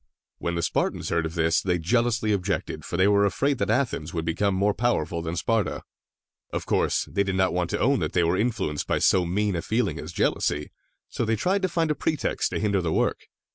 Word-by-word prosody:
When 85 Hz, 0 st, -2 dB
the 85 Hz, -, -1 dB
Spartans -, -, -1 dB
heard 80 Hz, -1 st, 0 dB
of 80 Hz, -, -9 dB
this, 80 Hz, 0 st, +2 dB
they 90 Hz, -2 st, 0 dB
jealously 115 Hz, +4 st, +1 dB
objected, 100 Hz, -1 st, -2 dB
for 85 Hz, -, -4 dB
they 95 Hz, +2 st, +4 dB
were 100 Hz, 0 st, +4 dB
afraid 135 Hz, +8 st, +1 dB
that -, -, 0 dB
Athens 110 Hz, -, -1 dB
would 80 Hz, -1 st, -2 dB
become 95 Hz, +4 st, 0 dB
more 100 Hz, +2 st, +2 dB
powerful 90 Hz, -8 st, 0 dB
than 80 Hz, +1 st, -4 dB
Sparta. 110 Hz, +5 st, 0 dB, 0.7 s
Of -, -, -3 dB
course, -, -, +1 dB
they 100 Hz, -, +1 dB
did 95 Hz, -1 st, 0 dB
not 95 Hz, 0 st, +2 dB
want 90 Hz, -1 st, -1 dB
to -, -, -2 dB
own 135 Hz, +2 st, +3 dB
that -, -, -2 dB
they 90 Hz, -, +3 dB
were 85 Hz, +2 st, +2 dB
influenced 105 Hz, -9 st, -1 dB
by -, -, +1 dB
so 90 Hz, -2 st, +3 dB
mean 100 Hz, +2 st, 0 dB
a 85 Hz, -, -1 dB
feeling 110 Hz, +3 st, -1 dB
as -, -, -7 dB
jealousy, 75 Hz, 0 st, 0 dB, 0.4 s
so -, -, -3 dB
they 115 Hz, 0 st, +1 dB
tried 185 Hz, -, 0 dB
to 185 Hz, -, +1 dB
find 165 Hz, -2 st, 0 dB
a -, -, +3 dB
pretext 155 Hz, -2 st, -1 dB
to -, -, -2 dB
hinder 100 Hz, -2 st, +1 dB
the 85 Hz, -2 st, -1 dB
work. -, -, 0 dB
100 Hz, 225 wpm, -25 LUFS, 85-115 Hz, 0.7 s, they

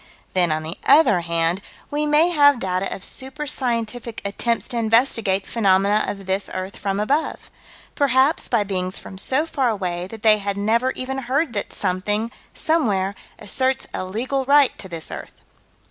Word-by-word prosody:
Then, 175 Hz, -3 st, +2 dB
on 155 Hz, 0 st, -1 dB
the 160 Hz, +3 st, -6 dB
other 210 Hz, -, +5 dB
hand, 170 Hz, +2 st, 0 dB, 0.3 s
we 300 Hz, +1 st, 0 dB
may 300 Hz, +3 st, +4 dB
have 285 Hz, -4 st, +5 dB
data 185 Hz, -2 st, -2 dB
of 195 Hz, -, -5 dB
super 270 Hz, +3 st, -5 dB
scientific 235 Hz, -3 st, -2 dB
attempts 230 Hz, +3 st, -1 dB
to 240 Hz, -, -2 dB
investigate 225 Hz, -4 st, +2 dB
phenomena 200 Hz, -1 st, +2 dB
of 195 Hz, -1 st, -5 dB
this 190 Hz, +1 st, -1 dB
earth 185 Hz, +1 st, -4 dB
from 195 Hz, 0 st, -2 dB
above 280 Hz, +9 st, -1 dB, 0.4 s
perhaps 275 Hz, +1 st, +2 dB
by 235 Hz, -4 st, +2 dB
beings 185 Hz, -2 st, -2 dB
from 190 Hz, -, -9 dB
so 265 Hz, +9 st, +1 dB
far 275 Hz, -6 st, 0 dB
away 180 Hz, -4 st, -2 dB
that 220 Hz, +1 st, -10 dB
they 215 Hz, -1 st, +5 dB
had 200 Hz, 0 st, -3 dB
never 230 Hz, +5 st, +2 dB
even 265 Hz, +1 st, -4 dB
heard 265 Hz, +2 st, -1 dB
that 205 Hz, -, -3 dB
something, 205 Hz, +5 st, 0 dB, 0.2 s
somewhere, 205 Hz, -, +1 dB, 0.2 s
asserts 260 Hz, +6 st, 0 dB
a -, -, -2 dB
legal 245 Hz, +8 st, -2 dB
right 285 Hz, 0 st, +5 dB
to 190 Hz, -, -6 dB
this 165 Hz, -2 st, -6 dB
earth. -, -, -8 dB
215 Hz, 165 wpm, -22 LUFS, 190-265 Hz, 0.4 s, other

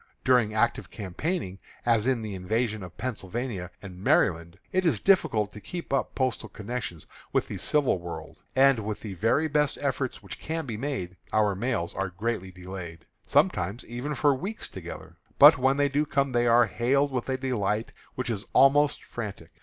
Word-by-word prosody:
During 125 Hz, -4 st, +4 dB
active 120 Hz, +2 st, +1 dB
campaigning, 100 Hz, -, -3 dB, 0.3 s
as 115 Hz, -1 st, +3 dB
in 125 Hz, -4 st, +1 dB
the 105 Hz, -2 st, -5 dB
invasion 110 Hz, +4 st, -1 dB
of 90 Hz, -2 st, -10 dB
Pennsylvania 110 Hz, -4 st, -4 dB
and 95 Hz, -1 st, -9 dB
Maryland, 85 Hz, -3 st, +2 dB
it 185 Hz, 0 st, +2 dB
is 150 Hz, -, +2 dB
difficult 110 Hz, -, +3 dB
to 105 Hz, -, -10 dB
keep 170 Hz, -, -6 dB
up 135 Hz, -, 0 dB
postal 130 Hz, -2 st, -1 dB
connections 105 Hz, -6 st, -5 dB, 0.3 s
with -, -, +1 dB
the -, -, -5 dB
civil 145 Hz, -10 st, +2 dB
world, 85 Hz, -2 st, -8 dB
and, 135 Hz, -2 st, +5 dB
with 105 Hz, -1 st, -4 dB
the 105 Hz, -3 st, -6 dB
very 115 Hz, -, +2 dB
best 150 Hz, -1 st, +1 dB
efforts 140 Hz, -5 st, -2 dB
which 95 Hz, -, -9 dB
can 160 Hz, 0 st, -3 dB
be 115 Hz, -5 st, -4 dB
made, 105 Hz, -8 st, -4 dB
our 105 Hz, -2 st, +3 dB
mails 95 Hz, -4 st, -2 dB
are 95 Hz, 0 st, -2 dB
greatly 95 Hz, 0 st, -3 dB
delayed, 90 Hz, -2 st, -8 dB, 0.2 s
sometimes 125 Hz, -, +1 dB
even 125 Hz, +6 st, -4 dB
for 145 Hz, +1 st, +4 dB
weeks 195 Hz, +12 st, -4 dB
together. 85 Hz, -2 st, -9 dB, 0.2 s
But -, -, +9 dB
when 135 Hz, +2 st, +3 dB
they 145 Hz, 0 st, +3 dB
do 145 Hz, +2 st, 0 dB
come, 140 Hz, -1 st, +1 dB
they 120 Hz, -1 st, +2 dB
are 120 Hz, +1 st, +6 dB
hailed 140 Hz, +5 st, +1 dB
with 125 Hz, 0 st, -3 dB
a 130 Hz, -, 0 dB
delight 115 Hz, -5 st, -1 dB, 0.2 s
which 125 Hz, -2 st, -2 dB
is 105 Hz, -1 st, -3 dB
almost 145 Hz, +2 st, +5 dB
frantic. 105 Hz, -4 st, -7 dB
120 Hz, 175 wpm, -27 LUFS, 95-135 Hz, 0.3 s, But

